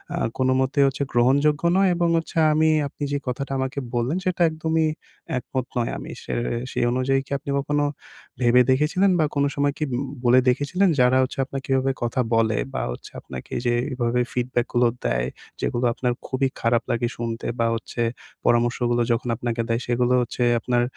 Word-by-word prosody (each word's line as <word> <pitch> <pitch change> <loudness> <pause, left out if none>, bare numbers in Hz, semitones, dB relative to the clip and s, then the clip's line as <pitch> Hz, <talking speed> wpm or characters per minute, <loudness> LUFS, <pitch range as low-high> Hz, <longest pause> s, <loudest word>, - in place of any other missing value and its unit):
আ - - -3 0.2
কোনোমতে 130 +2 +1
হচ্ছে 135 +1 -1
গ্রহণযোগ্য 140 +5 +3 0.2
নয় 195 -1 +4
এবং 170 0 +1
হচ্ছে 165 0 -4 0.2
আমি 160 +1 +3 0.2
আপনি 145 - -8
যে 145 - +1
কথাটা 130 +2 -3
আমাকে 130 +1 -2
বললেন 120 +7 0
সেটা 185 -1 -1
একদমই 160 0 0 0.5
একমত 130 0 -3
নয়। 120 -1 0 0.3
সে - - -5 0.4
সে - - -3
অনুযায়ী 130 +2 +1
কি - - -21
আপনি 140 - -10
কখনো 145 +1 0 0.6
ভেবে 125 +1 +5
দেখেছিলেন 155 +8 +3
বা 155 - +4
কোনো 140 0 +2
সময় 145 0 +1
কি 155 - -2
উ - - 0 0.3
বলে 125 +1 +6
দেখেছিলেন 145 +10 +2
যারা 125 +1 +5
হচ্ছে 130 - -4
আপনাকে 135 0 -6
এভাবে 135 0 +2
কথা 120 +2 0
বলে 110 -1 +2 0.2
বা - - -1
হচ্ছে - - -9
আপনাকে 65 -1 -9
যে 120 - +2 0.2
এভাবে 120 0 0
ফিডব্যাক 120 -1 0
গুলো 120 0 +4 0.2
দেয়, - - +1 0.3
যেগুলো 120 +1 0
আপনার 125 +1 -1
খুবই 135 0 +1
খারাপ 115 0 +2
লাগে 120 +1 0
শুনতে 115 -1 -4
বা 115 - +3
হচ্ছে 115 +1 -5 0.4
পরামর্শগুলো 120 0 +2
যখন 115 +1 0
আপনাকে 120 0 -2
দেয় 115 +1 0
সেগুলো 125 +1 +2
হচ্ছে 125 +1 -2 0.2
আপনার 120 +1 +1
125 Hz, 175 wpm, -23 LUFS, 120-140 Hz, 0.6 s, বলে